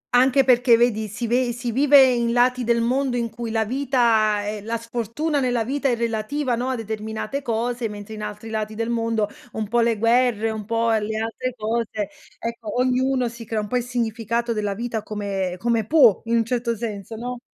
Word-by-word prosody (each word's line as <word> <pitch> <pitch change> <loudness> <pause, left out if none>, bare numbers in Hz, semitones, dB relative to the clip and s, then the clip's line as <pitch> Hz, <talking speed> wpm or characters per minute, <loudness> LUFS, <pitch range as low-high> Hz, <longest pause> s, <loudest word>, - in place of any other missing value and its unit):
Anche 265 +2 +5
perché 245 -2 +5
vedi, 220 -3 +1
si 220 +4 -5
ve 245 +1 +1
si 240 0 -4
vive 280 +2 +6
in 235 -2 +2
lati 250 +1 +3
del 235 0 +2
mondo 255 +1 0
in 230 -2 -2
cui 230 0 -5
la 220 -1 0
vita, 230 -5 +2
ehm 210 -1 -4
la 230 +1 -2
sfortuna 235 +6 -2
nella 245 -3 +1
vita 275 +3 -1
è 240 - +2
relativa, 235 +4 -1
no, 245 +2 -1
a 260 - 0
determinate 220 +4 -4
cose, 235 0 -1
mentre 205 +1 -8
in 215 - -7
altri 210 +1 -6
lati 215 0 -3
del 230 +1 -2
mondo, 225 -2 0 0.3
un 215 -2 -3
po' 240 +2 +1
le 230 -2 +2
guerre, 230 -1 +2
un 215 -2 -5
po' 230 +1 +1
le 220 0 0
altre 230 +3 -3
cose, 215 -2 -2 0.3
ecco, 230 0 -4
ognuno 255 0 +2
si 230 0 -8
crea 220 0 -2
un 210 - -5
po' 250 - 0
il 245 - -1
significato 235 -1 -1
della 205 -2 -2
vita 230 -1 -3
come 200 -4 -3
come 225 0 0
può, 265 - +5
in 235 +1 +1
un 225 - +2
certo 235 -1 -1
senso, 215 -1 -5
no? 245 +2 -5
230 Hz, 200 wpm, -23 LUFS, 220-245 Hz, 0.3 s, vive